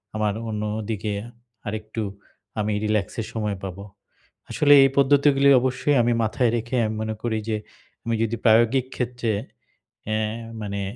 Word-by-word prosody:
আমার 105 -1 0 0.2
অন্যদিকে 105 0 -3 0.5
আরেকটু 110 +1 -4 0.6
আমি 105 0 0
relax 105 -3 +1
এর 110 - -6
সময় 105 -3 -2
পাবো। 95 +1 -6 0.7
আসলে 145 -1 +4
এই 135 - +5
পদ্ধতিগুলি 140 0 +4
অবশ্যই 130 +3 +1
আমি 120 +1 +2
মাথায় 115 +2 +1
রেখে 115 +3 -4
আমি 110 - -2
মনে 110 0 -3
করি 110 -2 0
যে, 110 - 0 0.5
আমি 115 0 0
যদি 115 +1 -1
প্রায়োগিক 115 +3 +4
ক্ষেত্রে। 120 -2 -2 0.8
অ্যা 110 0 0 0.4
মানে 100 -1 -4
110 Hz, 135 wpm, -24 LUFS, 105-125 Hz, 0.8 s, এই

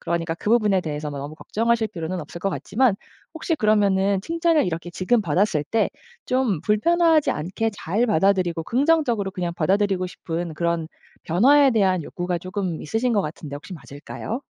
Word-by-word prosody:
그러니까 165 -1 -2
그 205 - -3
부분에 210 -5 +3
대해서 150 -2 -4
너무 145 +1 -6
걱정하실 230 +4 0
필요는 175 +1 -4
없을 155 +2 -9
것 195 - 0
같지만 225 +1 +1 0.4
혹시 325 +1 -1
그러면은 200 -5 +2
칭찬을 330 - +1
이렇게 170 0 -4
지금 215 +6 +1
받았을 170 -2 +1
때 225 +6 +1 0.4
좀 250 - +1
불편하지 320 - +3
않게 185 +8 -2
잘 200 +4 -1
받아들이고 180 -4 +1
긍정적으로 250 - +1
그냥 180 -3 -4
받아들이고 190 +2 +1
싶은 170 -1 -5
그런 170 0 -1 0.4
변화에 270 - +5
대한 190 -6 +2
욕구가 175 +3 -3
조금 185 -2 -4
있으신 230 +9 0
것 205 - +2
같은데 150 -2 -7
혹시 150 - -11
맞을까요? 155 - -7
195 Hz, 395 characters per minute, -23 LUFS, 170-225 Hz, 0.4 s, 변화에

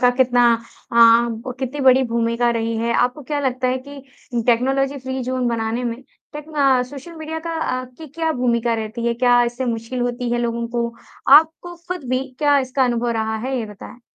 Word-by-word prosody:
का 245 - +5
कितना 245 -1 +3 0.5
अ, - - -2
ब 235 +1 +4
कितनी 265 +2 -4
बड़ी 265 0 +5
भूमिका 235 +1 +1
रही 230 -1 -1
है। 235 +1 0
आपको 250 +5 +1
क्या 290 +2 -2
लगता 255 -2 0
है 255 +1 0
कि 285 -1 -10 0.4
टेक्नोलॉजी 270 +3 +1
फ्री 260 0 -4
ज़ोन 255 0 -1
बनाने 230 +1 -2
में 230 -1 -2 0.4
टेक्न 300 +1 -9
अ, 270 -3 +3
सोशल 280 +6 -9
मीडिया 315 0 -5
का 330 - -3
अ, 255 -4 -2
की 255 +5 -12
क्या 320 +3 -2
भूमिका 240 -3 0
रहती 225 +1 -4
है? 235 - +1
क्या 245 0 +4
इससे 240 +2 -3
मुश्किल 230 +1 -3
होती 245 0 -2
है 240 - +1
लोगों 235 0 -2
को? 235 0 -1 0.5
आपको 320 +3 +1
खुद 360 -4 -4
भी 255 +1 0
क्या 290 -1 +4
इसका 260 0 0
अनुभव 240 -1 0
रहा 220 -1 -1
है? 260 +4 -3
ये 225 - -3
बताएँ। 210 +3 -12
250 Hz, 200 wpm, -20 LUFS, 235-270 Hz, 0.5 s, का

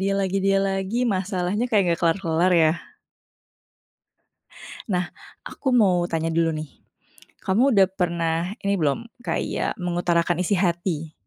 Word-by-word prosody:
dia 195 +1 0
lagi 195 0 -1
dia 195 0 +3
lagi, 195 +3 -2 0.2
masalahnya 185 +3 -1
kayak 215 -5 +3
nggak 170 -1 +1
kelar-kelar, 170 0 +1
ya. 155 - +4 2.2
Nah, 180 -1 -1 0.4
aku 265 - -3
mau 185 -7 +4
tanya 165 0 -1
dulu 165 0 +2
nih, 155 -1 -6 0.7
kamu 235 +7 +2
udah 195 -2 +5
pernah 170 -1 -1
ini 200 0 0
belum, 150 0 +1 0.3
kayak - - -2
mengutarakan 175 0 0
isi 200 - 0
hati? 170 -3 -1
180 Hz, 130 wpm, -23 LUFS, 170-195 Hz, 2.2 s, udah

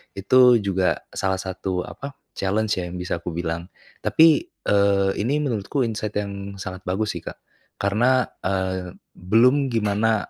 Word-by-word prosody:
itu 120 +4 +5
juga 95 -2 0
salah 95 0 -1
satu 95 -1 -3
apa, 140 +7 -8 0.2
challenge 105 +2 0
ya, 90 - -3
yang 85 - -7
bisa 90 -1 -3
aku 85 0 -6
bilang. 85 0 -3 0.3
Tapi, 160 - +4
eee, 100 - +2
ini 140 +8 +1
menurutku 125 +2 -1
insight 110 -2 -3
yang 100 -1 -6
sangat 95 0 -7
bagus 100 +3 0
sih - - -8
Kak. - - -6 0.5
Karena, 120 +6 +3 0.2
eee, 95 -1 -2 0.2
belum 125 +9 +3
gimana 110 0 +1
100 Hz, 145 wpm, -23 LUFS, 95-115 Hz, 0.5 s, itu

